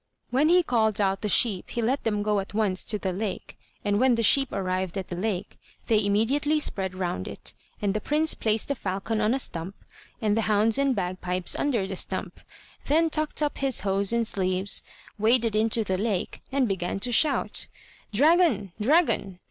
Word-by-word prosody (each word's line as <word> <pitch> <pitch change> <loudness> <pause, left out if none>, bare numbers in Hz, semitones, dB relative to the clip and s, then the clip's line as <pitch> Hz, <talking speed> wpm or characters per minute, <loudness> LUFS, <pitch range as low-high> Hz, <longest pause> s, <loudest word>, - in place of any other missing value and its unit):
When 280 +5 +3
he 355 +1 +5
called 220 -7 +1
out 195 -1 +1
the 210 - -2
sheep 200 -4 +2
he - - -4
let 260 +5 0
them 210 -2 0
go 210 -1 +1
at 195 +1 -7
once 200 -4 0
to 215 - 0
the 190 -2 -3
lake, 200 +1 -5 0.3
and 205 0 +1
when 255 -1 +4
the 230 - 0
sheep 270 +3 +4
arrived 185 -1 -2
at 190 - -5
the 175 - -4
lake, 195 0 -3 0.3
they 215 -2 +2
immediately 270 +10 +1
spread 190 -9 -1
round 175 - -3
it, - - -7 0.3
and 200 -1 +1
the 210 - -2
prince 310 +2 +1
placed 220 +2 0
the - - +2
falcon 210 -1 -3
on 215 +4 +2
a - - +1
stump, 185 -6 -3 0.4
and 210 -2 +1
the 225 - +1
hounds 215 +3 +3
and 275 -2 +2
bagpipes 180 -1 -2
under 240 -9 0
the 190 0 -5
stump, - - -4 0.5
then 320 +3 +3
tucked 305 0 0
up 295 - -2
his 270 -2 +1
hose 195 0 +1
and 235 0 +1
sleeves, 190 -2 0 0.4
waded 225 0 +2
into 225 +1 +2
the 190 -2 -2
lake, 210 -4 -2
and 265 -2 +1
began 190 -1 -2
to 245 - +1
shout: 285 +5 +2 0.4
"Dragon, 275 - +3
dragon! 250 - +2
215 Hz, 190 wpm, -26 LUFS, 195-255 Hz, 0.5 s, he